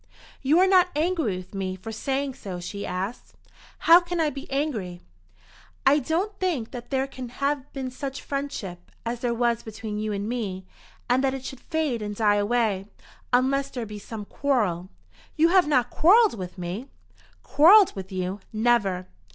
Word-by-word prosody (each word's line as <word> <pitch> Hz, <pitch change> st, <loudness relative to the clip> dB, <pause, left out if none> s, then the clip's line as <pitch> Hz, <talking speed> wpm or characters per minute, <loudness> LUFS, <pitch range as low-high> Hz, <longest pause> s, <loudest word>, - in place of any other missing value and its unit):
"You 280 Hz, +4 st, +3 dB
are 370 Hz, -, +6 dB
not 370 Hz, -1 st, +5 dB
angry 310 Hz, -, 0 dB
with 185 Hz, +2 st, -10 dB
me 190 Hz, -1 st, -3 dB
for 205 Hz, +4 st, -8 dB
saying 270 Hz, +4 st, -2 dB
so?" 190 Hz, -7 st, -7 dB
she 200 Hz, +3 st, -5 dB
asked. 190 Hz, +6 st, -5 dB, 0.4 s
"How 335 Hz, +1 st, +7 dB
can 350 Hz, -1 st, -4 dB
I 310 Hz, -2 st, +2 dB
be 275 Hz, -1 st, -8 dB
angry?" 235 Hz, -, -2 dB, 0.9 s
"I 290 Hz, -, +6 dB
don't 345 Hz, +9 st, -1 dB
think 320 Hz, -12 st, -1 dB
that 245 Hz, -2 st, -8 dB
there 265 Hz, -1 st, +1 dB
can 260 Hz, -2 st, -8 dB
have 280 Hz, +2 st, -2 dB
been 265 Hz, -2 st, -4 dB
such 270 Hz, +1 st, -6 dB
friendship, 225 Hz, -11 st, -5 dB, 0.2 s
as 235 Hz, +1 st, -2 dB
there 240 Hz, -1 st, -1 dB
was 235 Hz, -1 st, +1 dB
between 215 Hz, -1 st, -6 dB
you 215 Hz, 0 st, -2 dB
and 200 Hz, 0 st, -3 dB
me, 205 Hz, -6 st, -3 dB, 0.4 s
and 255 Hz, +2 st, +2 dB
that 270 Hz, 0 st, +1 dB
it 265 Hz, -1 st, -7 dB
should 265 Hz, -, -7 dB
fade 310 Hz, -8 st, -1 dB
and 210 Hz, 0 st, -4 dB
die 205 Hz, -1 st, +3 dB
away, 205 Hz, -2 st, +1 dB, 0.4 s
unless 265 Hz, +2 st, +2 dB
there 245 Hz, -3 st, -5 dB
be 210 Hz, -1 st, -8 dB
some 210 Hz, 0 st, -7 dB
quarrel. 205 Hz, -11 st, 0 dB, 0.5 s
You 325 Hz, +2 st, +4 dB
have 365 Hz, -2 st, +5 dB
not 255 Hz, -5 st, +2 dB
quarrelled 415 Hz, -, +5 dB
with 185 Hz, -3 st, -7 dB
me?" 180 Hz, +8 st, -5 dB, 0.6 s
"Quarrelled 375 Hz, +7 st, +6 dB
with 190 Hz, 0 st, -7 dB
you? 185 Hz, +1 st, -3 dB
Never!" 215 Hz, -5 st, +1 dB
245 Hz, 175 wpm, -25 LUFS, 205-285 Hz, 0.9 s, How